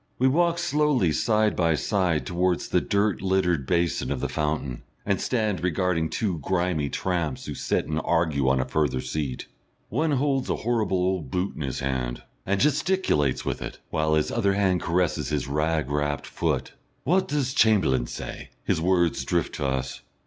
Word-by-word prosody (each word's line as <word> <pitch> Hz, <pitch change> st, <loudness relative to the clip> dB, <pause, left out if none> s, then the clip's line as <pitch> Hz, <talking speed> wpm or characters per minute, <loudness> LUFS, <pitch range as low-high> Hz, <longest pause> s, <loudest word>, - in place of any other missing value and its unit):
We 130 Hz, -, +3 dB
walk 170 Hz, +5 st, +3 dB
slowly 150 Hz, -, +2 dB
side 110 Hz, +5 st, +2 dB
by 85 Hz, -2 st, +2 dB
side 90 Hz, -2 st, 0 dB
towards 90 Hz, 0 st, 0 dB
the -, -, +2 dB
dirt 100 Hz, 0 st, +1 dB
littered 90 Hz, -7 st, +1 dB
basin 85 Hz, -1 st, 0 dB
of 70 Hz, -, -1 dB
the 70 Hz, -, -1 dB
fountain, 75 Hz, -5 st, -2 dB, 0.2 s
and 100 Hz, -2 st, 0 dB
stand 110 Hz, -7 st, 0 dB
regarding 90 Hz, -2 st, +1 dB
two 95 Hz, -7 st, -1 dB
grimy 85 Hz, -3 st, 0 dB
tramps 85 Hz, -6 st, -2 dB
who -, -, -4 dB
sit -, -, -1 dB
and 80 Hz, +1 st, -2 dB
argue 75 Hz, -5 st, +1 dB
on 65 Hz, 0 st, +2 dB
a 65 Hz, -, 0 dB
further 70 Hz, -4 st, 0 dB
seat. 65 Hz, +1 st, -3 dB, 0.4 s
One 150 Hz, +7 st, +1 dB
holds 135 Hz, -1 st, +1 dB
a -, -, +1 dB
horrible 110 Hz, -6 st, +1 dB
old 90 Hz, -5 st, -1 dB
boot 90 Hz, +6 st, -2 dB
in -, -, -7 dB
his 65 Hz, -3 st, -3 dB
hand, 65 Hz, -2 st, -2 dB, 0.2 s
and 100 Hz, +1 st, +1 dB
gesticulates 150 Hz, -, +1 dB
with -, -, -2 dB
it, -, -, -6 dB
while 80 Hz, 0 st, +1 dB
his 75 Hz, -, +1 dB
other 100 Hz, -1 st, +1 dB
hand 95 Hz, -3 st, +2 dB
caresses 90 Hz, -1 st, 0 dB
his 75 Hz, -4 st, -1 dB
rag 75 Hz, 0 st, 0 dB
wrapped 75 Hz, -1 st, -1 dB
foot. -, -, -2 dB, 0.3 s
"Wot 185 Hz, +7 st, +2 dB
does 140 Hz, -3 st, -1 dB
Cham'lain 90 Hz, -, +3 dB
si?" -, -, -7 dB
his 80 Hz, -, 0 dB
words 85 Hz, -1 st, +2 dB
drift -, -, -1 dB
to 70 Hz, -, -2 dB
us. 65 Hz, 0 st, -3 dB
90 Hz, 175 wpm, -25 LUFS, 75-105 Hz, 0.4 s, We